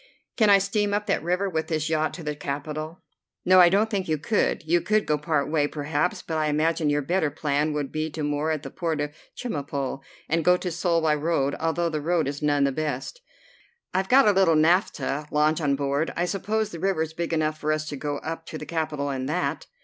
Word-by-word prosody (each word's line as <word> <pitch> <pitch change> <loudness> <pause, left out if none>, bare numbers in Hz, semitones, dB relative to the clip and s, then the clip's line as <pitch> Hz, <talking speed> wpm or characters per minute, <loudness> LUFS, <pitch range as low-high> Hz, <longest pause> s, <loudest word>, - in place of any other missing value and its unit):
"Can 215 -3 +4
I 200 - +8
steam 205 +1 0
up 210 0 -1
that - - 0
river 180 +4 0
with 160 -4 -2
this 155 -1 -1
yacht 155 -1 +1
to 175 - -8
the 150 -1 -3
capital?" 155 +3 -5 0.4
"No, 185 +1 +6
I 175 -1 +8
don't 205 +4 +3
think 195 -3 -1
you 155 -1 +1
could. 210 +9 0
You 170 +2 +2
could 215 +5 +1
go 150 - +2
part 150 -1 0
way, 150 -1 +1
perhaps, 150 +3 -2
but 160 - -3
I 155 - +1
imagine 155 +1 +1
your 145 0 +1
better 170 +1 +1
plan 145 +1 0
would 145 -2 -3
be 155 +1 -2
to 155 0 -5
moor 145 +1 -1
at 155 -2 -1
the - - -7
port 165 -4 -2
of 145 0 -2 0.3
Chemulpo 140 - -3 0.3
and 165 +1 +1
go 180 +3 +5
to 180 0 -4
Seoul 170 0 +1
by 155 -1 +3
road, 150 -2 0
although 170 +1 0
the 155 -2 -3
road 165 -1 +1
is 145 +1 -4
none 145 -1 +2
of 140 - 0
the 155 - -2
best." 155 - -4 0.7
"I've 190 +1 0
got 265 -1 +6
a - - +7
little 190 -4 +4
naphtha 155 -3 +1
launch 155 +2 +2
on 140 -2 +2
board. 140 +3 -1
I 175 - 0
suppose 210 +3 -1
the 170 - -7
river 190 -3 +1
is 160 0 -7
big 170 +1 -3
enough 155 -1 0
for 155 0 0
us 155 0 -1
to 145 - -4
go 145 +1 -3
up 165 0 -6
to 155 - -6
the 150 - -7
capital 150 -2 -2
in 130 -1 -3
that?" 175 +5 -2
155 Hz, 235 wpm, -25 LUFS, 150-175 Hz, 0.7 s, I